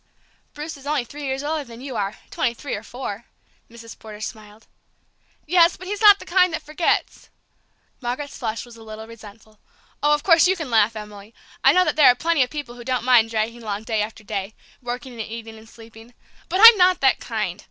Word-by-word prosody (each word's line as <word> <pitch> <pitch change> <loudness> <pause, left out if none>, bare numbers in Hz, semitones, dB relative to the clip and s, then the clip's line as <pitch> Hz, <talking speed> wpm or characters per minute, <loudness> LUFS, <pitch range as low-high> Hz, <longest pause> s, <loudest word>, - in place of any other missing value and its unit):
"Bruce 300 +1 -7
is 275 +1 -13
only 295 -3 0
three 290 +4 -9
years 265 +1 -3
older 305 0 -2
than 235 -3 -13
you 265 -1 -7
are, 200 -1 -3
twenty 235 - -1
three 285 +3 -6
or 205 - -4
four," 230 -2 -7 0.4
Mrs. 230 0 -13
Porter 215 -1 -11
smiled. 215 0 -9 0.8
"Yes, 340 +1 +4
but 370 - -11
he's 410 +2 -5
not 410 -2 +8
the - - -12
kind 365 +1 +3
that - - -4
forgets!" 305 +3 -1 0.7
Margaret's 255 +4 -5
flush 225 -1 -4
was 240 -1 -14
a 230 - -15
little 220 0 -9
resentful. 220 -1 -15 0.4
"Oh, 295 +1 +4
of 295 - -7
course, 330 -1 +5
you 375 - +2
can 320 -8 -6
laugh, 225 0 +3
Emily. 210 0 -10 0.3
I - - +7
know 365 0 +3
that - - -1
there 295 -3 +7
are 250 - +7
plenty 330 +2 +1
of 250 - +1
people 290 -5 -7
who 240 0 -11
don't 255 0 -2
mind 240 -3 +4
dragging 225 +1 -2
along 210 -1 -5
day 220 -1 -1
after 220 +1 -6
day, 200 0 -5 0.3
working 250 +2 -6
and 230 - -6
eating 225 0 -8
and 220 0 -15
sleeping 225 +1 -16 0.3
but 370 - -1
I'm 455 -1 +11
not 365 -1 +4
that 265 -1 +3
kind!" 210 -6 -4
240 Hz, 215 wpm, -22 LUFS, 220-295 Hz, 0.8 s, I'm